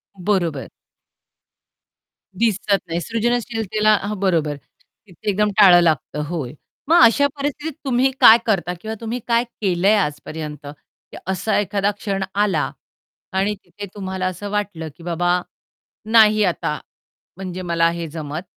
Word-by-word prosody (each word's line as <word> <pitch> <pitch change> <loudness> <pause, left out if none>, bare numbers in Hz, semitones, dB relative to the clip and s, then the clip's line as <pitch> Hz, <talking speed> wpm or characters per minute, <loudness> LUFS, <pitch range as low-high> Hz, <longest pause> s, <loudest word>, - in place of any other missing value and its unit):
बरोबर. 175 -7 -1 1.7
दिसत 205 -1 +1
नाही. 165 0 -2
सृजनशीलतेला 225 -1 0
हां, 205 0 -4
बरोबर. 165 -6 +1 0.5
तिथे 205 +3 -6
एकदम 210 +1 +2
टाळं 180 -4 +8
लागतं. 155 -2 0
होय. 150 -7 -4 0.4
मग 340 +1 +6
अशा 260 +5 +5
परिस्थितीत 290 +2 -3
तुम्ही 265 0 +2
काय 225 - +10
करता 190 -5 0
किंवा 220 0 -5
तुम्ही 230 +2 -3
काय 235 0 +3 0.2
केलंय 195 +1 +3
आजपर्यंत? 150 -3 -4 0.4
की - - -9
असा 190 +4 0
एखादा 205 0 0
क्षण 200 -2 -3
आला 195 -7 +1 0.6
आणि 195 +2 0
तिथे 200 +3 -9
तुम्हाला 190 -2 -3
असं 195 +2 -4
वाटलं 200 -6 -3
की 170 - -15
बाबा, 175 +1 +1 0.7
नाही 215 -1 +5
आता 170 -4 -1 0.6
म्हणजे 185 -1 -6
मला 170 -1 +2
हे 170 0 -4
जमत 155 0 -6
195 Hz, 130 wpm, -21 LUFS, 170-215 Hz, 1.7 s, काय